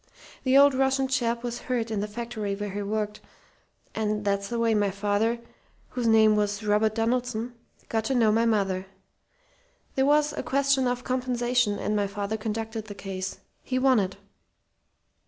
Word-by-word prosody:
The 260 Hz, +1 st, +5 dB
old 285 Hz, 0 st, +7 dB
Russian 265 Hz, 0 st, +2 dB
chap 235 Hz, -2 st, 0 dB
was 240 Hz, -1 st, -3 dB
hurt 235 Hz, -3 st, -1 dB
in 215 Hz, -, -1 dB
the 205 Hz, -, -2 dB
factory 215 Hz, -2 st, -4 dB
where 205 Hz, 0 st, -4 dB
he 205 Hz, +2 st, -3 dB
worked, 210 Hz, +1 st, -3 dB, 0.7 s
and 210 Hz, -1 st, -1 dB
that's 200 Hz, 0 st, 0 dB
the 235 Hz, -, -3 dB
way 230 Hz, -1 st, +2 dB
my 205 Hz, -2 st, +2 dB
father 205 Hz, +4 st, 0 dB, 0.5 s
whose 245 Hz, -2 st, -2 dB
name 220 Hz, -1 st, +6 dB
was 205 Hz, 0 st, 0 dB
Robert 210 Hz, +1 st, +2 dB
Donaldson 240 Hz, 0 st, -1 dB, 0.3 s
got 220 Hz, -1 st, -1 dB
to 265 Hz, -, 0 dB
know 225 Hz, -3 st, +4 dB
my 230 Hz, +2 st, +3 dB
mother. 195 Hz, -4 st, 0 dB, 1.1 s
There 265 Hz, 0 st, +2 dB
was 300 Hz, 0 st, +3 dB
a -, -, -3 dB
question 275 Hz, -1 st, +2 dB
of 245 Hz, 0 st, -2 dB
compensation, 245 Hz, -3 st, 0 dB
and 210 Hz, -, -1 dB
my 205 Hz, -1 st, +1 dB
father 200 Hz, +2 st, -3 dB
conducted 220 Hz, 0 st, -4 dB
the 205 Hz, -1 st, -8 dB
case. 190 Hz, -1 st, -5 dB, 0.2 s
He 255 Hz, -, -2 dB
won 260 Hz, -2 st, +4 dB
it. 190 Hz, -1 st, -2 dB
225 Hz, 170 wpm, -26 LUFS, 205-245 Hz, 1.1 s, old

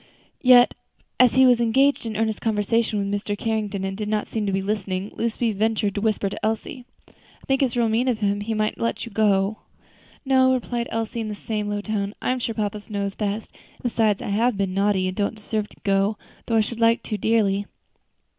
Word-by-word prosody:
Yet, 250 Hz, -1 st, +7 dB, 0.5 s
as 250 Hz, -1 st, +5 dB
he 260 Hz, 0 st, +7 dB
was 245 Hz, -2 st, +5 dB
engaged 250 Hz, +2 st, +2 dB
in 215 Hz, -2 st, -4 dB
earnest 220 Hz, -1 st, -1 dB
conversation 220 Hz, 0 st, +1 dB
with 200 Hz, -1 st, -1 dB
Mr. 205 Hz, 0 st, -2 dB
Carrington, 210 Hz, -3 st, -2 dB
and 195 Hz, 0 st, -3 dB
did 210 Hz, +1 st, -4 dB
not 215 Hz, -1 st, -1 dB
seem 215 Hz, -2 st, -2 dB
to -, -, +1 dB
be 195 Hz, 0 st, -1 dB
listening 195 Hz, -1 st, -2 dB
to -, -, -20 dB
them, -, -, -13 dB
Lucy 230 Hz, 0 st, 0 dB
ventured 215 Hz, 0 st, 0 dB
to 205 Hz, -, -3 dB
whisper 215 Hz, -2 st, +1 dB
to 195 Hz, -, -6 dB
Elsie, 225 Hz, +3 st, -3 dB, 0.2 s
"I -, -, -22 dB, 0.4 s
think 270 Hz, 0 st, +2 dB
it's 255 Hz, -3 st, +1 dB
real 235 Hz, -1 st, +3 dB
mean 225 Hz, +4 st, +1 dB
of 245 Hz, -3 st, +1 dB
him; 205 Hz, -1 st, 0 dB
he 220 Hz, +2 st, -2 dB
might 215 Hz, 0 st, -1 dB
let 230 Hz, +1 st, -2 dB
you 230 Hz, -, -10 dB
go." 205 Hz, 0 st, +2 dB, 0.7 s
"No," 260 Hz, -1 st, +4 dB
replied 240 Hz, -1 st, -3 dB
Elsie, 225 Hz, +1 st, -3 dB
in 220 Hz, -, -3 dB
the 210 Hz, -, -4 dB
same 210 Hz, 0 st, -3 dB
low 205 Hz, 0 st, -2 dB
tone, 205 Hz, -1 st, -3 dB
"I'm 255 Hz, 0 st, -1 dB
sure 230 Hz, -2 st, -3 dB
papa 210 Hz, -1 st, -2 dB
knows 200 Hz, -2 st, -2 dB
best; 210 Hz, +1 st, -3 dB, 0.2 s
and -, -, -23 dB
besides, 220 Hz, -4 st, +1 dB
I -, -, -4 dB
have 225 Hz, +2 st, +1 dB
been 195 Hz, -2 st, -1 dB
naughty, 195 Hz, -1 st, +1 dB
and 185 Hz, -, -3 dB
don't 205 Hz, +2 st, -1 dB
deserve 215 Hz, 0 st, -3 dB
to -, -, -19 dB
go, 200 Hz, +1 st, +1 dB, 0.3 s
though 230 Hz, -, +1 dB
I 220 Hz, -, +5 dB
should 230 Hz, +2 st, -4 dB
like 230 Hz, 0 st, +3 dB
to, 215 Hz, -, -3 dB
dearly." 205 Hz, -2 st, +1 dB
215 Hz, 220 wpm, -23 LUFS, 205-230 Hz, 0.7 s, Yet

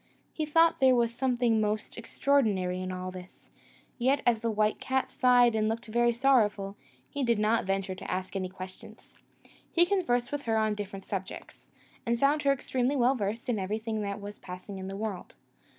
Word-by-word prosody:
He 310 Hz, -2 st, -3 dB
thought 330 Hz, +2 st, +4 dB
there 260 Hz, -1 st, +5 dB
was 235 Hz, -1 st, +1 dB
something 240 Hz, -3 st, +1 dB
most 210 Hz, 0 st, -2 dB
extraordinary 215 Hz, -8 st, 0 dB
in 185 Hz, 0 st, -4 dB
all 185 Hz, 0 st, -5 dB
this: 185 Hz, 0 st, -12 dB, 0.5 s
yet, 270 Hz, +3 st, +2 dB
as 235 Hz, -2 st, +3 dB
the 230 Hz, +1 st, -1 dB
white 215 Hz, 0 st, +1 dB
cat 265 Hz, 0 st, -1 dB
sighed 245 Hz, -2 st, +4 dB
and 215 Hz, 0 st, +1 dB
looked 230 Hz, +2 st, -3 dB
very 240 Hz, +2 st, +2 dB
sorrowful, 220 Hz, -6 st, +2 dB, 0.3 s
he 285 Hz, -1 st, -3 dB
did 235 Hz, -2 st, +2 dB
not 215 Hz, +1 st, +2 dB
venture 195 Hz, 0 st, -1 dB
to 185 Hz, -, -9 dB
ask 185 Hz, +2 st, -3 dB
any 185 Hz, -1 st, -2 dB
questions. 185 Hz, 0 st, -11 dB, 0.6 s
He 345 Hz, 0 st, +5 dB
conversed 245 Hz, -11 st, 0 dB
with 290 Hz, -1 st, -2 dB
her 225 Hz, -1 st, +1 dB
on 215 Hz, -1 st, +2 dB
different 200 Hz, -2 st, -6 dB
subjects, 190 Hz, -1 st, -7 dB, 0.3 s
and 235 Hz, 0 st, 0 dB
found 285 Hz, +3 st, +3 dB
her 280 Hz, -, +3 dB
extremely 260 Hz, 0 st, 0 dB
well 255 Hz, 0 st, +3 dB
versed 220 Hz, -1 st, -3 dB
in 235 Hz, -4 st, 0 dB
everything 215 Hz, +3 st, -3 dB
that 200 Hz, 0 st, -3 dB
was 205 Hz, 0 st, -9 dB
passing 185 Hz, +2 st, -8 dB
in 190 Hz, -, -6 dB
the 195 Hz, 0 st, -5 dB
world. 210 Hz, -4 st, -5 dB
220 Hz, 185 wpm, -29 LUFS, 195-250 Hz, 0.6 s, there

